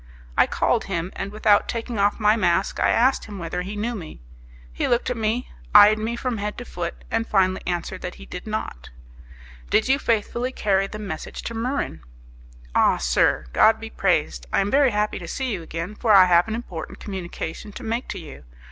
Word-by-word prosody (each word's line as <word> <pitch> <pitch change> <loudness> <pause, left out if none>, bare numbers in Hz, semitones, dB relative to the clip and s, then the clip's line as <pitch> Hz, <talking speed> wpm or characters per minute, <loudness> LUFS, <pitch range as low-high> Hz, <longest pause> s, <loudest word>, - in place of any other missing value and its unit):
I - - +5
called - - +1
him, 180 -1 -3
and 195 +1 -4
without 210 -1 +3
taking 230 -1 -3
off 205 +2 +2
my 210 0 +4
mask 190 -3 +1
I - - +3
asked 260 +3 +3
him 205 -2 -8
whether 175 0 -3
he 195 +3 -6
knew 225 +4 -2
me. 175 -8 -8 0.5
He - - -1
looked 240 +1 +1
at - - -1
me, 225 +2 -1 0.2
eyed 210 +1 +8
me 225 +2 -2
from 240 -2 -3
head 210 +1 -3
to 245 - -7
foot, 170 -4 -5
and 225 0 0
finally 190 -2 +2
answered 180 +1 -3
that 180 - -5
he - - -12
did 180 - -8
not. 210 - -5 0.8
"Did 220 - +3
you 270 +2 +3
faithfully 235 +2 0
carry 195 -5 +1
the 215 - -7
message 195 -7 -6
to 230 - -5
Muran?" 235 - -2 0.7
"Ah, - - +4
sir! 60 0 +2
God - - +5
be - - -8
praised! - - 0
I - - +3
am 200 +1 -1
very 280 -1 +5
happy 210 -1 -1
to - - -8
see 265 -2 -3
you 185 - -4
again, 165 +4 -5
for 220 +1 0
I 195 -3 +9
have 175 +1 +4
an 220 - -2
important 185 -8 -7
communication 190 0 -6
to 260 - -8
make 230 +2 -2
to - - -5
you. 160 -5 -10
210 Hz, 205 wpm, -23 LUFS, 180-230 Hz, 0.8 s, I